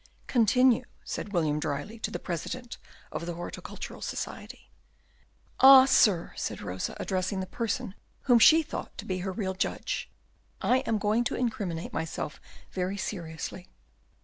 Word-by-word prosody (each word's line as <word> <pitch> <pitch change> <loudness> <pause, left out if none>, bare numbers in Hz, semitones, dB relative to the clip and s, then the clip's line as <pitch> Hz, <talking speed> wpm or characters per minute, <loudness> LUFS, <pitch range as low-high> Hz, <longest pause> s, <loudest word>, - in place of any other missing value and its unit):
"Continue," 250 +1 +4 0.2
said 205 - -5
William 155 -5 +1
dryly, 150 +11 -4
to - - -2
the - - -4
President 230 +9 -5 0.3
of 170 - -4
the 175 - -3
Horticultural 175 - -7
Society. - - -6 0.9
"Ah, 265 0 +10
sir," 210 -10 +4
said - - -3
Rosa, 90 +1 -4
addressing 190 +1 -1
the 190 - -2
person 235 +1 -3 0.3
whom 245 -3 +5
she 320 +8 +7
thought 310 - -7
to - - -6
be 185 -1 -2
her 190 +1 -3
real 190 -1 -2
judge, 185 - -2 0.5
"I 255 - +3
am 225 - +2
going 210 +3 +2
to 270 - -1
incriminate 210 -9 -2
myself 160 -2 -4 0.3
very 185 +1 -2
seriously." 175 -2 -5
200 Hz, 145 wpm, -28 LUFS, 175-240 Hz, 0.9 s, Ah